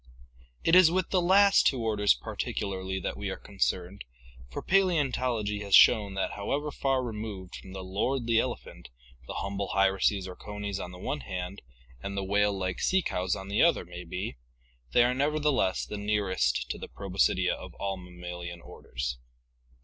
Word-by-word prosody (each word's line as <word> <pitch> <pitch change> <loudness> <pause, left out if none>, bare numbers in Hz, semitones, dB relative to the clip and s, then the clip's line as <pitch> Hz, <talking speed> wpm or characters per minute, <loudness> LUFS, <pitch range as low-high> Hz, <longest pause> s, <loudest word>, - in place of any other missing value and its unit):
It 165 - +5
is 185 -3 +8
with 185 +1 0
the 185 - +3
last 195 +3 +5
two 130 - +1
orders 105 - +3
particularly 95 +8 -3
that - - -3
we - - -3
are - - -4
concerned, 90 +10 -2 0.5
for - - -6
Paleontology 130 - +1
has 100 -2 +3
shown 100 -3 +6
that 95 - -1
however 145 +9 -2
far 135 -2 0
removed 105 -5 -6
from 95 - -11
the 95 -1 -6
lordly 115 +5 0
elephant 120 - -5 0.4
the - - -6
humble 100 0 -3
hyraces 95 0 +2
or 90 - -8
conies 105 -1 -5
on 90 - -5
the 90 - -10
one 145 +10 -3
hand 90 -2 -5 0.4
and 100 +4 -5
the 100 - -1
whale 105 +1 +2
like 95 -1 -2
sea 190 -1 +2
cows 90 -1 -1
on 95 0 -7
the 100 +1 +1
other 170 - +4
may 90 +1 -8
be, 90 -4 -5 0.5
they 120 - +6
are 125 +1 +2
nevertheless 145 -7 +1
the 105 - -6
nearest 105 -2 0
to - - -5
the - - -7
Proboscidea 95 -1 +1
of - - -9
all 100 -1 -2
mammalian 90 -1 -8
orders. - - -6
100 Hz, 170 wpm, -29 LUFS, 95-125 Hz, 0.5 s, is